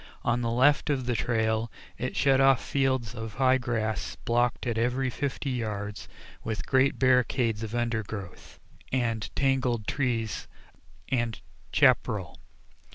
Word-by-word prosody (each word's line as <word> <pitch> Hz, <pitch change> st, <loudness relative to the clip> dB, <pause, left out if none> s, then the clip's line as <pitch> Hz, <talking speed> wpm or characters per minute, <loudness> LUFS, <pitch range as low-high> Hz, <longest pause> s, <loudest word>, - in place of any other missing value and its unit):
On 120 Hz, +1 st, +1 dB
the 115 Hz, -, -1 dB
left 135 Hz, +6 st, +3 dB
of 135 Hz, -4 st, 0 dB
the 125 Hz, -, 0 dB
trail 110 Hz, 0 st, 0 dB, 0.2 s
it 125 Hz, +1 st, -4 dB
shut 135 Hz, -1 st, +4 dB
off 135 Hz, -2 st, +5 dB
fields 130 Hz, -4 st, 0 dB
of 110 Hz, -2 st, -7 dB
high 130 Hz, 0 st, +3 dB
grass 115 Hz, -3 st, -2 dB
blocked 120 Hz, +1 st, +1 dB
at 120 Hz, -2 st, -1 dB
every 125 Hz, +2 st, 0 dB
fifty 140 Hz, +1 st, -3 dB
yards 105 Hz, -4 st, -4 dB, 0.4 s
with 110 Hz, -1 st, -3 dB
great 135 Hz, +1 st, +3 dB
barricades 125 Hz, -3 st, +2 dB
of 110 Hz, +1 st, -4 dB
undergrowth 110 Hz, -5 st, -4 dB, 0.3 s
and 115 Hz, -4 st, -1 dB
tangled 130 Hz, -5 st, +1 dB
trees 115 Hz, -6 st, -1 dB, 0.6 s
and 120 Hz, -3 st, -1 dB, 0.3 s
chapparal. -, -, +2 dB
120 Hz, 130 wpm, -28 LUFS, 110-130 Hz, 0.6 s, off